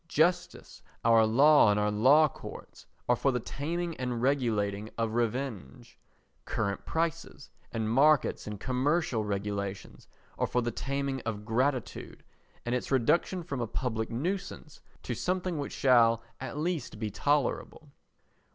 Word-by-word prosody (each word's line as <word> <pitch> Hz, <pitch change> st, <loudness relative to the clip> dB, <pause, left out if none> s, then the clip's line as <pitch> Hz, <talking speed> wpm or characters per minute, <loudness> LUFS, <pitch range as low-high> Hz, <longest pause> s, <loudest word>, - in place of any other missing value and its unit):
Justice, 175 Hz, +2 st, 0 dB, 0.2 s
our 115 Hz, -1 st, +5 dB
law 140 Hz, +2 st, +6 dB
and 105 Hz, 0 st, +2 dB
our 105 Hz, 0 st, +1 dB
law 135 Hz, +9 st, +5 dB
courts -, -, -11 dB, 0.2 s
are 125 Hz, -, +4 dB
for 135 Hz, +3 st, +1 dB
the 125 Hz, -, -1 dB
taming 165 Hz, +7 st, -4 dB
and 125 Hz, -2 st, -3 dB
regulating 110 Hz, -6 st, 0 dB
of 115 Hz, -1 st, -1 dB
revenge. 115 Hz, -, -3 dB, 0.4 s
Current 100 Hz, -2 st, -3 dB
prices 165 Hz, -2 st, -3 dB, 0.2 s
and 110 Hz, -2 st, -2 dB
markets 140 Hz, +4 st, +3 dB
and 105 Hz, -1 st, -6 dB
commercial 130 Hz, 0 st, 0 dB
regulations 100 Hz, -1 st, -4 dB, 0.3 s
are -, -, +1 dB
for 125 Hz, -, 0 dB
the 120 Hz, -, -1 dB
taming 140 Hz, 0 st, -3 dB
of 105 Hz, -2 st, -5 dB
gratitude 125 Hz, +2 st, -2 dB, 0.4 s
and 120 Hz, -, -1 dB
its 125 Hz, -, -2 dB
reduction 165 Hz, +8 st, +1 dB
from 140 Hz, -6 st, -4 dB
a 120 Hz, -, -2 dB
public 110 Hz, -1 st, -3 dB
nuisance 175 Hz, +4 st, -4 dB, 0.2 s
to 125 Hz, -, -3 dB
something 180 Hz, +4 st, -2 dB
which 140 Hz, -, -4 dB
shall 115 Hz, -3 st, +4 dB, 0.2 s
at 135 Hz, +2 st, -6 dB
least 160 Hz, -7 st, -3 dB
be 105 Hz, -1 st, -3 dB
tolerable. 145 Hz, +3 st, -1 dB
125 Hz, 140 wpm, -29 LUFS, 110-150 Hz, 0.4 s, law